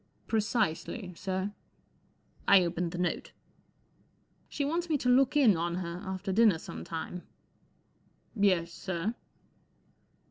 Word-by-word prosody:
" - - -39
Precisely, 215 -3 -1
sir." 190 +2 -2 1.0
I 195 -2 +7
opened 170 0 -2
the 180 - -5
note. 175 0 -2 0.6
" - - -38
She 285 - -2
wants 335 +4 -1
me 305 - +3
to 250 - -3
look 265 +3 +4
in 240 -9 +6
on 170 +1 -1
her 175 -1 -4
after 190 +1 -3
dinner 215 -4 +5
some 80 - -8
time*" 165 - -5 1.1
I - - -8
Yes* 170 -3 +2
sir 185 +3 -3
190 Hz, 135 wpm, -30 LUFS, 175-225 Hz, 1.1 s, I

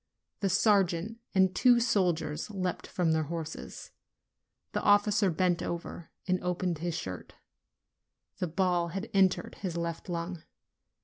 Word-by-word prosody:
The 195 - 0
sergeant 200 +1 +2 0.2
and 190 -1 +4
two 245 +3 +5
soldiers 175 -8 0
leaped 185 -4 -3
from 175 -3 0
their 160 -1 +1
horses. 160 0 -6 0.8
The - - -1
officer 205 -1 +4
bent 175 +1 +1
over 170 -1 -5 0.2
and 185 0 0
opened 180 -2 -1
his 170 0 -2
shirt. 95 - -7 1.0
The 180 - 0
ball 175 0 +1
had 195 +6 -5
entered 190 -2 +2
his 180 -4 -3
left 170 +1 -4
lung. 170 0 -4
180 Hz, 130 wpm, -30 LUFS, 170-195 Hz, 1.0 s, two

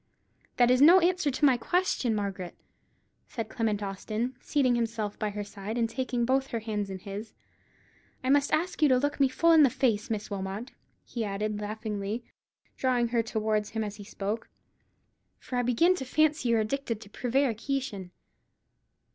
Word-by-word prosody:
"That 245 0 +5
is 255 +1 +4
no 340 +6 +9
answer 360 -3 +2
to 280 +2 +1
my 260 -3 +5
question, 260 -5 0
Margaret," 195 -3 -4 0.7
said 225 -2 -5
Clement 215 -3 -1
Austin, 215 +5 -3
seating 270 -4 +2
himself 225 -3 -2
by 215 - 0
her 205 0 -4
side, 205 +2 -6
and 230 -1 +2
taking 245 0 -1
both 265 +2 +1
her 230 -4 -3
hands 210 -2 -3
in 190 - -5
his. 200 +3 -7 0.9
"I 260 - +2
must 285 0 +3
ask 335 +2 0
you 300 - +6
to 255 - +5
look 290 +3 -1
me 275 - +5
full 335 +6 +3
in 320 -1 +7
the 280 - +7
face, 225 -4 0
Miss 215 -2 -3
Wilmot," 195 +5 -4 0.3
he 235 - -4
added, 210 +1 -2
laughingly, 210 +1 -4 0.5
drawing 245 -2 +1
her 235 -1 +2
towards 215 -2 -1
him 220 0 -2
as 210 -1 -5
he 205 - -9
spoke; 205 +3 -4 0.9
"for 250 - -5
I - - +3
begin 250 +9 +3
to - - -4
fancy 300 -1 +1
you're 230 -1 +3
addicted 230 0 -2
to 205 - -11
prevarication. 250 -4 -1
230 Hz, 170 wpm, -28 LUFS, 210-265 Hz, 0.9 s, no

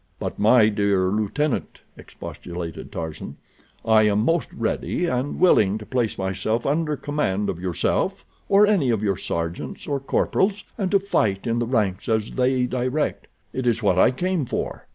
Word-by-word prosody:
"But, - - -5
my 110 +1 +5
dear 100 -3 +1
lieutenant," 110 +8 -1
expostulated 85 -1 -8
Tarzan, 80 -2 -6 0.5
"I 110 -1 +5
am 105 +1 +2
most 165 -1 +1
ready 115 +9 -2
and 130 -2 -2
willing 105 - +4
to 105 - -9
place 120 -3 -1
myself 95 +4 -1
under 150 +1 0
command 105 -10 -1
of - - -8
yourself 90 -2 -1 0.2
or 200 +1 +6
any 195 -11 +2
of 110 -3 0
your 100 -3 +1
sergeants 85 +1 -4
or 140 -1 -1
corporals, 195 +8 0
and 195 -4 -1
to 200 - +4
fight 110 - 0
in 115 0 0
the 120 - -1
ranks 105 -7 0
as 110 -1 0
they 130 0 +1
direct. 130 +4 -2 0.3
It 130 -1 -2
is 115 -1 +1
what 95 -3 +3
I - - +6
came 180 +5 -1
for." - - -4
115 Hz, 165 wpm, -23 LUFS, 100-145 Hz, 0.5 s, or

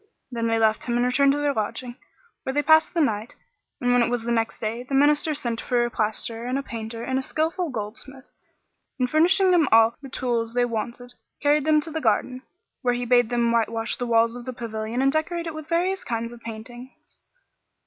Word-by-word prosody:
Then 230 -1 -1
they 225 0 +1
left 220 -1 +2
him 240 -1 0
and 245 - +2
returned 275 +3 +3
to - - -1
their 290 -1 0
lodging, 235 +2 -3 0.5
where 265 - -4
they 290 +1 +1
passed 315 +3 +4
the 335 - +3
night; 220 -5 -1 0.4
and 245 0 +2
when 245 - +4
it 235 - +2
was 245 -1 -1
the 235 - -2
next 225 -1 0
day, 225 +2 -3
the 260 +2 -4
Minister 295 +2 +3
sent 235 -5 -3
for 240 -1 +1
a 240 - -4
plasterer 225 +2 -2
and 255 +2 -1
a 275 - -3
painter 230 -1 -6
and 260 +1 -1
a - - -2
skilful 320 +5 -1
goldsmith 255 +4 -7 0.7
and, 255 -2 +1
furnishing 360 +7 +4
them 350 -2 +5
with - - -1
all 225 0 +6
the 270 - -9
tools 235 -3 -2
they 245 0 +3
wanted, 240 +2 -5 0.3
carried 290 0 +2
them 310 -1 +4
to 320 - -8
the 320 +1 -3
garden, 255 +2 0 0.4
where 245 -1 +1
he 245 0 -3
bade 245 -1 +3
them 235 -1 +1
whitewash 230 0 0
the 245 - -3
walls 230 0 +3
of 245 -1 -8
the 255 - -5
pavilion 230 +1 -3
and 270 - +4
decorate 335 +3 -1
it 325 - -4
with 310 0 -9
various 360 +3 0
kinds 230 0 -3
of 235 - -13
paintings. 240 +3 -11
245 Hz, 220 wpm, -24 LUFS, 230-285 Hz, 0.7 s, all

